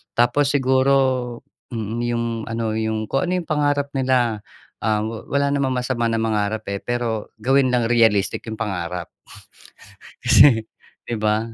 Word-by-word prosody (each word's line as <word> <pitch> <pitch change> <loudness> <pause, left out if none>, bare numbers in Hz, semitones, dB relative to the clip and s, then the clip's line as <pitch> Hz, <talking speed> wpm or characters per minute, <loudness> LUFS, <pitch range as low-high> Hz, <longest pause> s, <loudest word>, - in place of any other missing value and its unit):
Tapos 120 +4 +3
siguro, 135 0 +3 0.8
mm, 115 0 -4
'yong 120 -1 -1 0.2
ano 115 -1 -2
'yong 110 -1 -2
kung 135 +7 +1
ano 180 +1 0
'yong - - -23
pangarap 145 -1 0
nila. 125 -4 +1 0.4
Ah 110 -1 +1
wala 140 +6 -2
namang 140 -2 0
masama 125 -2 -1
na 115 - 0
mangarap 110 -1 -1
eh 100 - -3
pero 120 -3 -2
gawin 130 +3 +3
lang 120 -2 +2
realistic 110 -4 +2
'yong 110 0 -6
pangarap. 90 -4 -3 1.1
Kasi, 115 -6 +6 0.4
'di 120 - -3
ba? 110 +1 +1
115 Hz, 140 wpm, -21 LUFS, 110-130 Hz, 1.1 s, Kasi